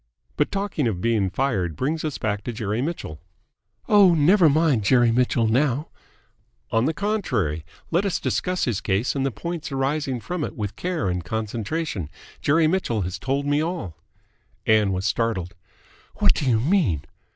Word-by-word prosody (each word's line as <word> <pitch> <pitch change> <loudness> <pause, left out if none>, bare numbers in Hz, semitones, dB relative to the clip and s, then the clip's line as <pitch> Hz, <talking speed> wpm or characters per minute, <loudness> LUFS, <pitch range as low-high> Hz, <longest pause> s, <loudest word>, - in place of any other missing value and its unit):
But 150 - +1
talking 195 -9 -1
of 100 -6 -2
being 105 -2 +1
fired 95 - -1
brings 155 - -1
us 155 -3 -2
back 105 -2 -2
to - - -2
Jerry 110 0 -2
Mitchell." 135 - -4 0.7
"Oh, 200 -5 +6
never 165 +3 +5
mind 145 -6 +2
Jerry 120 +2 +4
Mitchell 120 -1 +2
now 135 +5 +1 0.4
" - - -42
"On 115 +2 +2
the 160 - +1
contrary, 125 - -1 0.3
let 170 +4 +2
us 195 -4 0
discuss 180 0 -1
his 115 -6 -1
case 100 +8 0
and 135 - 0
the - - +1
points 165 - -5
arising 135 -1 -1
from 175 +6 -4
it - - -4
with 105 -1 -4
care 175 - -2
and 90 -1 -1
concentration. 110 - -3 0.3
Jerry 160 +3 +3
Mitchell 155 - 0
has 90 +1 -4
told 140 +2 -1
me 145 +1 +2
all!" 160 - -3 0.7
Ann 105 -2 +4
was 95 0 -2
startled. 105 -6 -1 0.6
"What - - +4
do 135 - -1
you 115 -3 +3
mean?" 115 - +1
125 Hz, 170 wpm, -24 LUFS, 105-160 Hz, 0.7 s, Oh